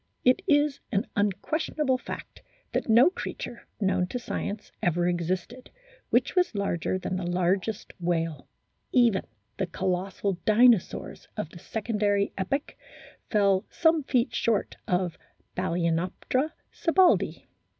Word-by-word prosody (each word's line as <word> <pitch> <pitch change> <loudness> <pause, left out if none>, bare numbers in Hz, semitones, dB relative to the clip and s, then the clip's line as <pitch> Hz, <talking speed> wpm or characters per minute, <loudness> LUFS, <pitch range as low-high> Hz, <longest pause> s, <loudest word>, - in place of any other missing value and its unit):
It 255 0 +5
is 290 -1 +3
an 200 -3 +1
unquestionable 260 - 0
fact - - -8 0.3
that - - -1
no 245 +10 +7
creature, 240 - -6
known 190 -3 +1
to 250 - -3
science, 215 -3 -4
ever 175 0 +2
existed 180 +8 -2
f - - -38 0.4
which - - +2
was 360 - +2
larger 185 -2 0
than 185 0 -3
the 180 -2 -3
largest 185 +4 0
whale; 165 -2 -1 0.4
even 235 -6 +4 0.4
the 190 - -1
colossal 185 +1 -2
Dinosaurs 225 -2 +3
of 160 - -3
the 175 - -11
secondary 205 -1 0
epoch 275 +10 -2 0.5
fell 200 -3 +3
some 325 -1 +3
feet 250 -3 +1
short 230 -3 0
of 180 -1 0 0.3
Balcenoptera 175 - 0 0.2
sibbaldii. 360 +1 +3
200 Hz, 120 wpm, -27 LUFS, 180-250 Hz, 0.5 s, no